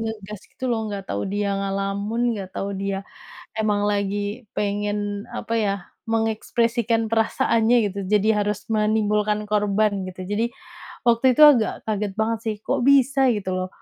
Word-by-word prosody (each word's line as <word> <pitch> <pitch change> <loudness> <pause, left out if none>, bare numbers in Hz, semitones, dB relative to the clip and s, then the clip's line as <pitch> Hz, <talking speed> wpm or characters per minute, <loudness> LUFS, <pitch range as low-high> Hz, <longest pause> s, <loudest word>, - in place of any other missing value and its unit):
ngegas 210 -3 -5
gitu - - -9
loh, 220 -2 -1
nggak 200 -2 -5
tahu 100 - -2
dia 200 0 -1
ngelamun, 200 +4 -1
nggak 195 -2 -6
tahu 200 0 -2
dia 195 0 -3 0.5
emang 210 -2 +1
lagi 205 +3 -2
pengen 205 0 -2
apa 230 - -4
ya, 205 -3 +1 0.3
mengekspresikan 225 +1 0
perasaannya 225 +1 +2
gitu, 200 - -8
jadi 210 +1 +3 0.2
harus 205 0 -2
menimbulkan 210 -1 +1
korban 205 -1 +1
gitu. 185 0 -8
Jadi, 205 +4 0 0.6
waktu 235 +2 +4
itu - - +6
agak 260 -7 +6
kaget 210 -2 -1
banget 225 +1 +1
sih 220 - 0
kok 270 -1 0
bisa 275 0 +4
gitu 205 -4 -3
loh, 185 0 -2
210 Hz, 150 wpm, -23 LUFS, 200-225 Hz, 0.6 s, itu